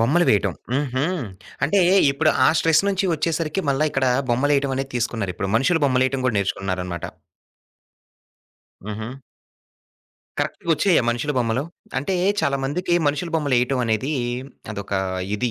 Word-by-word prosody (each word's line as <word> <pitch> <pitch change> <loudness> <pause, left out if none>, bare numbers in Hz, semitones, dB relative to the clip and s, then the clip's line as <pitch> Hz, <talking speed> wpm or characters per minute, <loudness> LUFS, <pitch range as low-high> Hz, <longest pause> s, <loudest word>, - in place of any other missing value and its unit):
బొమ్మలు 150 +10 +3
వేయటం. 105 - +2 0.2
హుహు. 135 -1 0 0.6
అంటే 195 +8 +3 0.3
ఇప్పుడు 155 +3 +2 0.2
ఆ - - +6
స్ట్రెస్ 160 +1 +4
నుంచి 195 0 0
ఒచ్చేసరికి 160 +2 -1
మళ్లీ 140 +3 +1
ఇక్కడ 135 0 +1 0.2
బొమ్మలేయటం 140 +2 +2
అనేది 135 +1 -4
తీసుకున్నారు 115 -5 -2
ఇప్పుడు. 95 - -3
మనుషుల 165 +7 +2
బొమ్మలు 130 -1 +2
వేయటం 130 0 -2
కూడా 115 -4 +1
నేర్చుకుంటున్నారనమాట. 95 -3 -3 1.8
హుహు. 110 +3 -5 1.3
కరెక్ట్‌గోచ్చాయా 170 +2 +1
మనుషుల 120 +5 -1
బొమ్మలు? 120 +1 0 0.4
అంటే 145 +8 -2 0.3
చాలామందికి 140 +5 0
మనుషుల 150 +4 -1
బొమ్మలు 145 -4 +1
ఏయటం 125 +1 0
అనేది 115 +6 0 0.6
అదొక 100 -1 -7 0.4
ఇది. 125 +2 -1
135 Hz, 125 wpm, -22 LUFS, 115-155 Hz, 1.8 s, ఆ